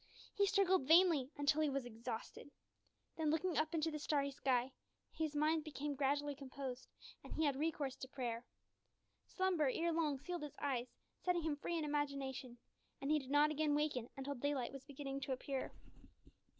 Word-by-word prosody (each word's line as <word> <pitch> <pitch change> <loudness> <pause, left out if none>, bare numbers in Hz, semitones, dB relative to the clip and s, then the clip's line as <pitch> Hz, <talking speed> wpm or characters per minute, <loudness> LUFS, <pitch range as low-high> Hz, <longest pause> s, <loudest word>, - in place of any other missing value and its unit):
He 400 0 +3
struggled 380 -7 +3
vainly 325 -5 +6
until 290 +2 +3
he 305 - +3
was 275 -2 -1
exhausted. 230 +3 -6 0.7
Then, 315 -2 +1
looking 325 +3 +1
up 310 +2 +1
into 320 0 +1
the 305 - -3
starry 285 -1 +1
sky, 260 -2 +1 0.4
his 315 -2 -2
mind 310 +1 +3
became 295 -1 -3
gradually 285 +1 +1
composed, 265 -2 -6 0.4
and - - -11
he 315 - +2
had 285 -2 +2
recourse 290 -2 -1
to 260 - -6
prayer. 240 -3 -3 0.8
Slumber 365 -7 +2
ere 335 +4 +1
long 310 -4 +1
sealed 345 +5 -4
his 295 -2 -6
eyes, 255 -4 0 0.4
setting 355 -2 +2
him 310 -2 0
free 340 +3 -2
in 315 - -1
imagination, 275 -4 -2 0.4
and 275 +2 -1
he 305 - +5
did 265 -2 -10
not 295 +2 +5
again 305 -1 +2
waken 290 -6 0
until 270 +1 -3
daylight 275 -1 -1
was 275 -1 -8
beginning 275 -1 -5
to 265 - -1
appear. 265 +1 -3
290 Hz, 175 wpm, -39 LUFS, 270-310 Hz, 0.8 s, vainly